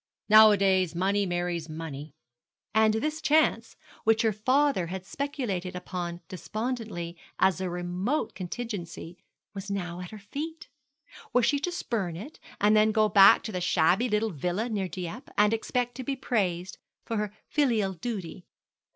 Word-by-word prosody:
Nowadays 200 -5 +6
money 195 +3 +1
marries 175 -2 -2
money.' 155 -2 -7 0.6
And 220 0 +4
this 305 +7 -2
chance, 300 -7 +2 0.3
which 225 0 +3
her 220 -1 +2
father 255 -2 +2
had 185 +1 -6
speculated 205 -10 -3
upon 175 -1 -5
despondently 215 -3 -4 0.2
as 190 -1 +2
a 185 - -1
remote 180 - -2
contingency, 180 -3 -6 0.3
was 200 0 -7
now 180 -3 -3
at 180 - -7
her 215 - -9
feet. 310 +11 -6 0.7
Was 250 -1 +4
she 285 +4 +2
to 355 +5 -2
spurn 210 - -2
it, 215 - -9 0.2
and 210 +1 +4
then 215 0 +5
go 215 -1 +3
back 195 -1 +7
to 220 - -5
the 180 -2 -3
shabby 180 +7 +2
little 215 +1 +1
villa 180 - -2
near 200 -4 -1
Dieppe, 180 - -7
and 210 +1 +4
expect 245 +2 -1
to 260 - -5
be 275 +2 -2
praised 190 -8 -2 0.3
for 225 - -2
her 210 -1 -2 0.2
filial 230 -10 +1
duty? 185 -2 -6
205 Hz, 150 wpm, -28 LUFS, 180-230 Hz, 0.7 s, back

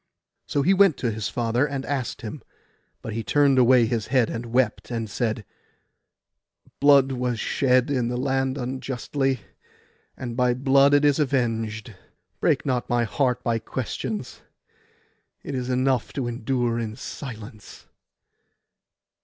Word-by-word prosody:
So 140 - 0
he 185 +6 +4
went 195 -7 +5
to 120 - -1
his 110 -2 -3
father, 120 +2 0
and 140 -2 -2
asked 135 -5 -3
him; 115 +6 -6 0.6
but 115 - -5
he 115 +1 -3
turned 140 +3 +3
away 125 -1 +6
his 115 -2 -2
head 125 -2 +2
and 120 +1 -5
wept, 120 -1 0
and 115 -2 -3
said, 110 0 -2 1.3
'Blood 140 -2 +5
was 125 -2 -2
shed 130 +4 +2
in 125 -4 0
the 120 +1 -2
land 135 +1 0
unjustly, 130 0 -2 0.8
and 120 -2 -5
by 125 -1 +2
blood 135 +2 +4
it 145 +1 +3
is 145 +1 +3
avenged. 115 -5 -1 0.5
Break - - +1
not 125 -3 -1
my 120 -1 +2
heart 125 +1 0
by 115 -2 0
questions; 115 0 -5 1.0
it - - -6
is 130 -1 -3
enough 130 -1 +1
to 135 -3 -2
endure 120 0 -1
in 110 -2 -4
silence. 115 -4 -9
125 Hz, 140 wpm, -24 LUFS, 115-135 Hz, 1.3 s, away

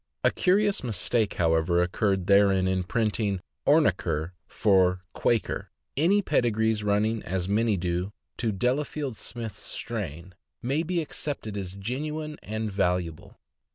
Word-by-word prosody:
A - - +5
curious 200 0 +2
mistake, 110 -1 0
however, 80 +1 +2
occurred 95 +1 +1
therein, 100 -1 +4
in 95 0 +1
printing 105 -1 0 0.3
"Ornaker" 90 - +2 0.2
for 95 -3 +3
''Quaker." 115 -3 0 0.3
Any 190 +8 +3
pedi 125 -8 +2
grees 110 0 +1
running 105 +2 +1
(as 90 0 -2
many 105 +1 +2
do) 90 +2 -2 0.3
to 115 -2 0
Delafield 130 +4 -1
Smith's 110 -2 -6
strain 95 -8 -5 0.3
may 135 +6 0
be 170 +1 -1
accepted 140 -8 -4
as 95 -2 -4
genuine 150 +9 -4
and 110 0 -3
valuable. 90 -4 -1
105 Hz, 125 wpm, -27 LUFS, 95-125 Hz, 0.3 s, A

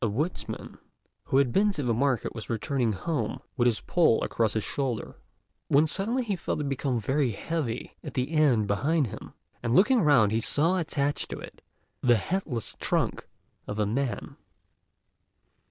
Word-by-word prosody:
A 115 - +2
woodsman 150 - -4 0.5
who 130 - +1
had 135 -3 +3
been 205 +1 +4
to 150 - -3
market 125 +1 +1
was 110 - -8
returning 120 0 0
home 115 - -2 0.2
with 125 -3 +3
his 115 -3 +1
pole 165 -10 +3
across 110 -3 0
his 110 - -1
shoulder, 130 -6 -3 0.5
when 145 +3 +5
suddenly 220 +10 0
he 210 -4 -1
felt 175 - -3
it 145 - -2
become 135 -2 -1
very 135 +4 +1
heavy 145 -1 -3
at - - -7
the 130 +4 -1
end 145 -9 +3
behind 145 +10 +1
him, - - -9 0.3
and 115 +1 0
looking 220 - +5
round 125 -10 +5
he 110 +1 +1
saw 165 +10 +2
attached 145 -3 -1
to - - -5
it - - -11 0.4
the 120 -1 +5
headless 135 - -3
trunk - - -1 0.4
of 105 - -4
a 105 - +2
man. 125 +5 -2
135 Hz, 165 wpm, -27 LUFS, 115-160 Hz, 0.5 s, when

